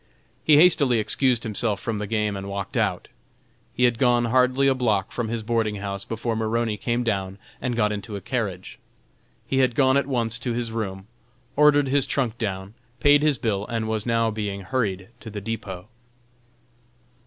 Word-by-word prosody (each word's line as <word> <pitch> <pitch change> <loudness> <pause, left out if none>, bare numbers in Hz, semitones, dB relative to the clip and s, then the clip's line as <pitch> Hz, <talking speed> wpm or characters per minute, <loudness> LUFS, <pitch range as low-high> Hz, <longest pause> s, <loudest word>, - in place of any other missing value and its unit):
He 155 - +6
hastily 145 -7 +5
excused 120 +3 +1
himself 105 -1 -1
from 110 -3 -3
the 105 - -4
game 105 -1 0
and 100 0 -6
walked 100 0 -5
out. 100 -7 0 0.6
He 125 - -1
had 120 -2 +3
gone 120 -2 +3
hardly 130 +3 +3
a 135 - +4
block 110 -7 0
from 120 -2 -3
his 115 0 -3
boarding 110 -2 0
house 100 -1 -5
before 115 0 -3
Maroney 110 0 0
came 120 +3 -1
down 100 -4 -2 0.2
and 125 -2 -1
got 105 -2 +2
into 105 +1 -5
a - - -4
carriage. 95 -5 -4 0.7
He 135 - 0
had 130 -3 +2
gone 130 -1 +4
at 140 - 0
once 115 -4 -1
to 120 -1 -2
his 120 -1 -3
room, 95 -4 -4 0.5
ordered 145 -1 +5
his 140 0 +2
trunk 120 -4 -1
down, 95 -3 -4 0.3
paid 145 +3 +5
his 150 -3 +3
bill 105 -3 -2
and 115 -1 -2
was 110 0 -2
now 115 -1 +2
being 105 -2 -4
hurried 95 -2 -2
to 110 - -9
the 105 -1 -5
depot. 100 -3 -6
115 Hz, 180 wpm, -24 LUFS, 105-125 Hz, 0.7 s, He